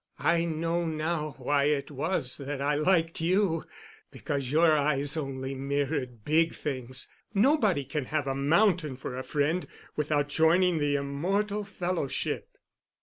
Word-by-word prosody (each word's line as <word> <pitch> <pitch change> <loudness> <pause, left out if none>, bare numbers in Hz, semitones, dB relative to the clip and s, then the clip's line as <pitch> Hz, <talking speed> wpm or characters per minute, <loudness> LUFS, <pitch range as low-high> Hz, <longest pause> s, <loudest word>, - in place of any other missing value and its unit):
I 170 0 +3
know 165 +1 -1
now 155 -1 -2
why 140 +2 +1
it 145 0 0
was 145 -2 0
that 140 0 -5
I 140 +2 +1
liked 165 +2 +1
you—because 165 -6 -2
your 160 +1 +5
eyes 145 -1 +2
only 135 -3 -4
mirrored 135 -3 -2
big 160 +2 +2
things—nobody 160 - 0
can 150 0 -3
have 150 +2 -1
a 135 - -1
mountain 155 +1 +2
for 125 -1 -6
a 130 - -4
friend 150 +6 0 0.3
without 150 -1 0
joining 165 +3 +3
the 145 -1 +1
immortal 195 +10 -1
Fellowship. 180 -7 -3
150 Hz, 130 wpm, -28 LUFS, 140-170 Hz, 0.3 s, your